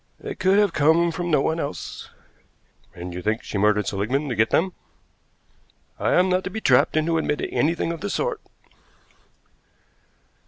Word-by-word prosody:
"They - - -6
could 190 +1 +2
have 205 -3 +3
come 165 +3 +3
from 175 +1 -4
no 150 -4 +3
one 160 +3 0
else." 145 -2 -6 0.9
"And 90 0 -7
you 90 - -5
think 110 +4 -1
she 100 - -4
murdered 105 0 +2
Seligmann 125 +9 -1
to 125 - -2
get 110 +1 +2
them?" 185 +2 +1 1.3
"I - - +1
am 180 +1 +4
not 185 0 +1
to - - -2
be 220 - -5
trapped 185 - +3
into 165 +1 +1
admitting 150 -2 -2
anything 165 +2 0
of 170 - -6
the 205 - -3
sort." - - -2
160 Hz, 165 wpm, -23 LUFS, 110-180 Hz, 1.3 s, am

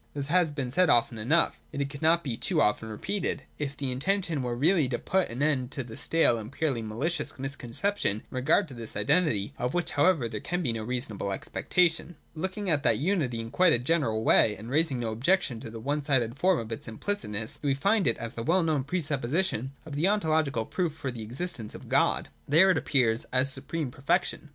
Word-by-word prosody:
This 140 0 -3
has 180 -4 +4
been 135 -4 -4
said 180 +5 +3
often 115 -2 +2
enough. 150 +10 +2
Yet 140 - -1
it 140 - -6
could 140 - -8
not 165 +2 +3
be 125 -5 -3
too - - 0
often 110 +1 +1
repeated, 195 - -2 0.2
if 140 -1 -4
the 135 -2 -2
intention 170 +3 -1
were 120 -1 -2
really 155 +1 +3
to 120 - -1
put 190 +7 0
an 125 +5 -3
end 135 -5 +1
to 130 - -3
the 115 -2 -10
stale 160 -8 +2
and 110 +2 -8
purely 140 -6 -1
malicious 140 +11 -2
misconception 135 - -2
in - - -11
regard 130 +9 +2
to - - -9
this 115 -2 -8
identity: 105 - +1
— - - -26
of 125 +4 -1
which 175 -1 -1
however 145 -3 +3
there 110 -2 -5
can 175 +7 -3
be 120 -6 0
no 115 - -4
reasonable 115 -4 -3
expectation. 175 - 0 0.2
Looking 190 +5 -4
at 155 -5 +2
that - - +3
unity 145 -8 0
in 115 - -7
a - - -16
quite 155 -5 +4
general 125 -8 +1
way, 105 -1 +4
and 115 +4 -9
raising 150 -3 +1
no 115 -2 -2
objection 125 - +1
to 115 - -8
the 115 0 -8
one 145 +6 -1
sided 130 -5 +1
form 185 +4 +3
of 115 0 -5
its 115 - -5
implicit 205 - -3
ness, 105 +1 -3
we 140 -2 +1
find 200 +5 +2
it 115 - +2
as 115 0 -6
the 115 - -5
well 170 +9 +2
known 155 -4 +1
pre 175 +6 -2
supposition 140 - -1
of 155 - -8
the 150 +6 +1
ontological 155 - +1
proof 170 0 -2
for 135 -4 -4
the 120 -2 -7
existence 120 0 -5
of - - -11
God. - - +2 0.2
There, 170 +7 +6
it 180 - +2
appears 120 -5 +1
as 130 +2 +4
supreme 140 +1 -2
perfection. 155 +4 -1
140 Hz, 220 wpm, -28 LUFS, 115-165 Hz, 0.2 s, There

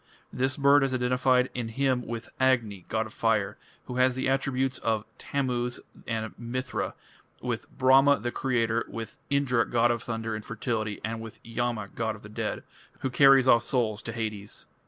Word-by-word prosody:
This 130 +1 0
bird 140 0 +5
is 135 -1 0
identified 125 0 +2
in 120 -2 -3
a - - -8
hymn 130 -1 +1
with 115 0 -5
Agni, 115 -8 +1
god 110 0 0
of 110 - -11
fire, 110 -3 0 0.3
who 125 - -5
has 130 0 +4
the 130 - -1
attributes 135 -1 0
of 110 -1 0
Tammuz 125 -3 -1 0.3
and 110 -1 -2
Mithra, 125 +2 -3 0.4
with - - -4
Brahma, 135 +2 +5
the 120 - -3
creator, 115 -3 0
with 115 -1 -7
Indra, 135 -4 +2
god 120 0 +3
of 120 -1 -1
thunder 115 -1 -3
and 110 0 -4
fertility, 110 -1 -3
and 115 +1 -3
with 115 -1 -9
Yama, 115 -3 -2
god 110 -1 -2
of 110 - -14
the 100 - -10
dead, 105 - -3 0.4
who 130 - -1
carries 135 0 +6
off 115 -2 +6
souls 115 -3 0
to 115 - -5
Hades. 110 -3 -5
120 Hz, 175 wpm, -28 LUFS, 115-130 Hz, 0.4 s, carries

